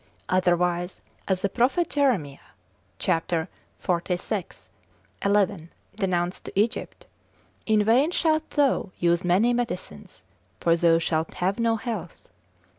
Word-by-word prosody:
Otherwise 180 -1 +1 0.3
as 190 -1 0
the - - +3
prophet 255 - +1
Jeremiah, 210 - 0 0.6
cap. 165 -3 0 0.8
xlvi. 180 +1 -4 0.6
11. 200 -4 +1 0.3
denounced 180 -3 -1
to - - -3
Egypt, 225 +4 -1 0.6
In 215 -1 +4
vain 245 +8 +4
shalt 315 -3 +1
thou 280 -8 +1
use 170 0 +2
many 190 +7 +3
medicines, 230 - -5 0.4
for 165 -1 +3
thou 170 -1 +4
shalt 160 -1 -1
have 190 +5 -1
no 230 -1 +2
health. 215 -7 -6
190 Hz, 115 wpm, -25 LUFS, 175-230 Hz, 0.8 s, In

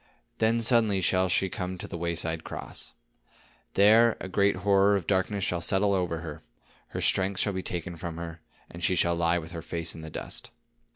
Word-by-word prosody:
Then 115 +1 +2
suddenly 110 -4 +4
shall 95 0 +2
she 95 +1 +2
come 90 0 -4
to - - -7
the - - -7
wayside 85 -1 -2
cross. - - -6 0.8
There 110 +3 +6
a - - -5
great 100 +1 +2
horror 100 0 +5
of 95 -4 -2
darkness 95 +2 0
shall 85 -3 -1
settle 100 +3 +3
over 90 -4 -1
her, 80 -2 -7 0.5
her - - -5
strength 95 0 +1
shall 100 - +1
be 95 - -2
taken 85 -1 -5
from 85 0 -6
her, 85 -1 -7 0.3
and 85 +1 -10
she 95 - +3
shall 85 -1 +2
lie 85 0 +2
with 80 -1 -6
her 85 -1 -6
face 85 0 -4
in 80 - -9
the 80 - -7
dust. 120 - -5
90 Hz, 195 wpm, -28 LUFS, 85-100 Hz, 0.8 s, There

